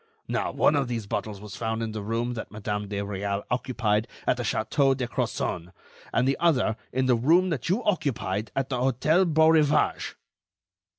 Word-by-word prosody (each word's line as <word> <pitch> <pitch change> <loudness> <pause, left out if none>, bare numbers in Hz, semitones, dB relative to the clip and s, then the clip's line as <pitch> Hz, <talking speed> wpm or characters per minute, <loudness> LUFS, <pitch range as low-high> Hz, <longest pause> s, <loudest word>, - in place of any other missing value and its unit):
Now, - - -1
one 150 - +3
of 140 -2 +1
these 115 -3 -3
bottles 100 0 -4
was 105 -1 -9
found 110 +1 -2
in 110 - -3
the 110 -1 -5
room 115 +4 -2
that 115 - -6
Madame 105 -1 -3
de 100 0 -4
Réal 100 0 -3
occupied 115 -4 0 0.2
at - - +2
the - - -2
Château 135 +4 +1
de 125 -2 -2
Crozon, 90 -6 -2 0.4
and 125 - +2
the 135 - +1
other 140 -10 +2 0.2
in 130 +1 0
the 130 - +4
room 170 +10 +3
that 140 -2 -2
you 210 +7 +1
occupied 135 - -1
at 135 -1 -1
the 130 - -1
Hôtel 150 +8 +2
Beaurivage." 160 -1 +3
120 Hz, 180 wpm, -26 LUFS, 105-140 Hz, 0.4 s, the